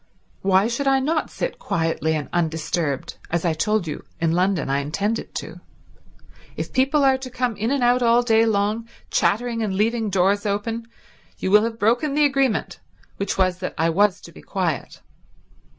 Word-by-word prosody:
Why 190 +1 +3
should 240 +4 -2
I 270 0 +4
not 310 +4 0
sit - - -4
quietly 160 -1 -1
and 150 -2 -3
undisturbed, 160 -3 -2
as 170 +1 -1
I 165 - +2
told 210 +4 0
you 150 -2 -5 0.2
in 165 -1 +1
London 180 -2 +1
I 135 +1 +1
intended 200 +10 -2
to? - - -6 1.0
If - - -5
people 275 +3 +3
are 265 -1 +4
to 260 -1 -7
come 250 -2 -1
in 215 +3 -1
and 275 -2 +1
out 245 +1 +3
all 235 0 +4
day 225 -1 +3
long, 215 +2 0 0.2
chattering 230 +2 +1
and 205 -3 -1
leaving 220 +2 +1
doors 195 +2 +2
open, 225 +3 -2 0.5
you 190 - -2
will 210 +2 +6
have 230 -1 -4
broken 240 +7 +1
the 300 0 +4
agreement, 275 -4 0 0.4
which 200 0 -2
was 185 -1 +1
that 185 - -4
I 165 +1 +2
was 200 +2 +3
to 170 - -12
be - - -14
quiet." 175 -9 -3
210 Hz, 180 wpm, -22 LUFS, 180-240 Hz, 1.0 s, will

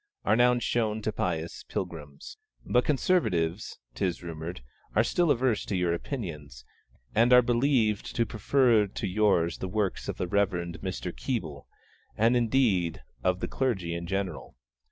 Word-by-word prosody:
are - - +4
now 125 +1 +4
shown 110 -2 0
to 110 0 -2
pious 85 -4 -3
pilgrims. 75 -6 -6 0.3
But 125 - +2
Conservatives, 110 - 0 0.2
't - - -4
is 90 -2 -1
rumoured, 80 -4 -6 0.3
are 110 - +5
still 175 +7 +1
averse 125 -4 +2
to 100 - -2
your 90 -1 +1
opinions, 75 - -6 0.5
and 115 +3 +4
are 125 0 +8
believed 120 -3 +1
to 115 - +2
prefer 115 -2 +3
to 100 +1 -4
yours 90 -4 +2
the 95 - -3
works 105 -1 -2
of - - -4
the 90 - -2
Reverend 90 -3 0
Mr. 95 -1 -4
Keble, 80 - -4 0.5
and, 115 +3 +4
indeed, 115 -8 +1 0.2
of 90 0 +1
the - - -1
clergy 100 -11 -1
in 85 0 -4
general. 95 -8 -3
100 Hz, 155 wpm, -28 LUFS, 85-120 Hz, 0.5 s, are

